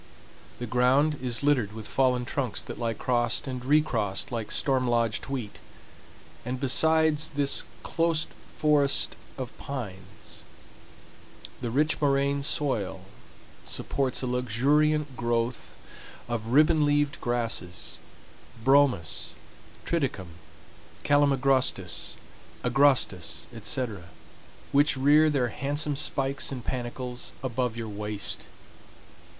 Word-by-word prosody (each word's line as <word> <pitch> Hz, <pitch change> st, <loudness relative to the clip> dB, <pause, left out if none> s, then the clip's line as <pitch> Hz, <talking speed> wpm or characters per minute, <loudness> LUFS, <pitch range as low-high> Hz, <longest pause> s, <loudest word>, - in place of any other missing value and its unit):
The 120 Hz, -, -4 dB
ground 130 Hz, +5 st, +2 dB
is 125 Hz, 0 st, -2 dB
littered 130 Hz, -8 st, +2 dB
with 110 Hz, -1 st, -8 dB
fallen 125 Hz, -1 st, +1 dB
trunks 125 Hz, -4 st, -2 dB
that -, -, -8 dB
lie 115 Hz, -1 st, -1 dB
crossed 120 Hz, 0 st, 0 dB
and 130 Hz, -2 st, -5 dB
recrossed 125 Hz, -10 st, +1 dB
like 115 Hz, -3 st, -3 dB
storm 130 Hz, -2 st, +1 dB
lodged 115 Hz, -2 st, 0 dB
wheat; 125 Hz, -7 st, -5 dB, 0.8 s
and 125 Hz, +2 st, -4 dB
besides 160 Hz, +3 st, +3 dB
this 140 Hz, -2 st, +2 dB, 0.2 s
close 165 Hz, -1 st, +1 dB, 0.3 s
forest 145 Hz, -2 st, +2 dB, 0.2 s
of 130 Hz, -3 st, -6 dB
pines, 105 Hz, -6 st, -8 dB, 1.2 s
the 120 Hz, -, -2 dB
rich 150 Hz, +7 st, +1 dB
moraine 140 Hz, 0 st, +2 dB
soil 105 Hz, -10 st, 0 dB, 0.6 s
supports 135 Hz, -2 st, -2 dB
a -, -, 0 dB
luxuriant 135 Hz, +4 st, +1 dB
growth 120 Hz, 0 st, -2 dB, 0.5 s
of 115 Hz, -2 st, -3 dB
ribbon 155 Hz, +5 st, +4 dB
leaved 145 Hz, 0 st, +1 dB
grasses—bromus, 120 Hz, -, -1 dB, 0.5 s
triticum, 135 Hz, -, -1 dB, 0.7 s
calamagrostis, 140 Hz, -2 st, +1 dB, 0.5 s
agrostis, 125 Hz, -9 st, +2 dB
etc., 110 Hz, -4 st, -3 dB, 0.7 s
which 145 Hz, 0 st, +4 dB
rear 150 Hz, +4 st, +5 dB
their 130 Hz, -5 st, +1 dB
handsome 145 Hz, +4 st, -1 dB
spikes 135 Hz, -1 st, 0 dB
and 125 Hz, -3 st, -6 dB
panicles 125 Hz, 0 st, -4 dB
above 125 Hz, -2 st, -1 dB
your 115 Hz, -1 st, -4 dB
waist. 105 Hz, 0 st, -1 dB
130 Hz, 100 wpm, -27 LUFS, 115-145 Hz, 1.2 s, rear